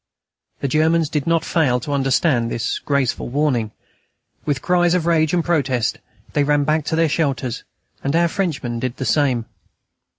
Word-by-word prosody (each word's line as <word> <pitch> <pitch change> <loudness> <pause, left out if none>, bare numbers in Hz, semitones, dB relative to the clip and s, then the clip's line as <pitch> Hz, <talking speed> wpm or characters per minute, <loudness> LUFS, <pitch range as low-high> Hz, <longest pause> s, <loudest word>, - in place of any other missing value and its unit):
The 140 - 0
Germans 155 +3 +2
did 150 -2 -2
not 165 -1 +2
fail 140 -8 +2
to 145 - -5
understand 135 -3 +1
this 115 - -2
graceful 140 -5 -1
warning. 130 -5 0 0.8
With 145 -3 -1
cries 175 -1 +3
of 175 -3 0
rage 160 -2 +2
and 175 -2 0
protest, 135 -9 0 0.3
they 145 - +2
ran 145 0 +2
back 155 +1 0
to 160 - -1
their 165 0 +3
shelters, 140 -6 -1 0.4
and 140 +3 0
our 170 +1 +4
Frenchmen 155 -11 -2
did 125 +1 -3
the 130 - -3
same. 130 -6 +1
145 Hz, 165 wpm, -20 LUFS, 130-165 Hz, 0.8 s, our